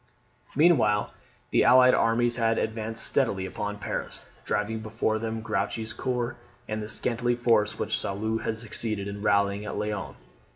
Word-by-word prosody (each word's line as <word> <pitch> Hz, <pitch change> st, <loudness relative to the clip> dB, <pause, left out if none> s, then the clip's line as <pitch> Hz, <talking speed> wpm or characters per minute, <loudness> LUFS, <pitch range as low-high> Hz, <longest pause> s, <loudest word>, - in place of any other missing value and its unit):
Meanwhile 140 Hz, -10 st, +3 dB, 0.4 s
the -, -, +4 dB
allied 125 Hz, 0 st, +7 dB
armies 120 Hz, +1 st, +2 dB
had 115 Hz, -1 st, +2 dB
advanced 110 Hz, 0 st, -1 dB
steadily 100 Hz, -9 st, +1 dB
upon 105 Hz, +2 st, -4 dB
Paris, -, -, -5 dB, 0.2 s
driving 105 Hz, +2 st, -1 dB
before 110 Hz, 0 st, -1 dB
them 110 Hz, 0 st, -3 dB
Grouchy's 110 Hz, 0 st, -2 dB
corps, 125 Hz, -1 st, -2 dB, 0.3 s
and 110 Hz, 0 st, -3 dB
the 105 Hz, -, -6 dB
scanty 120 Hz, +1 st, 0 dB
force 115 Hz, -3 st, +2 dB
which -, -, 0 dB
Soult 110 Hz, +3 st, -2 dB
had 110 Hz, -, -2 dB
succeeded 110 Hz, -2 st, -3 dB
in 100 Hz, 0 st, -6 dB
rallying 100 Hz, -1 st, +2 dB
at 105 Hz, -, -5 dB
Laon. 105 Hz, -1 st, -3 dB
110 Hz, 150 wpm, -27 LUFS, 105-115 Hz, 0.4 s, allied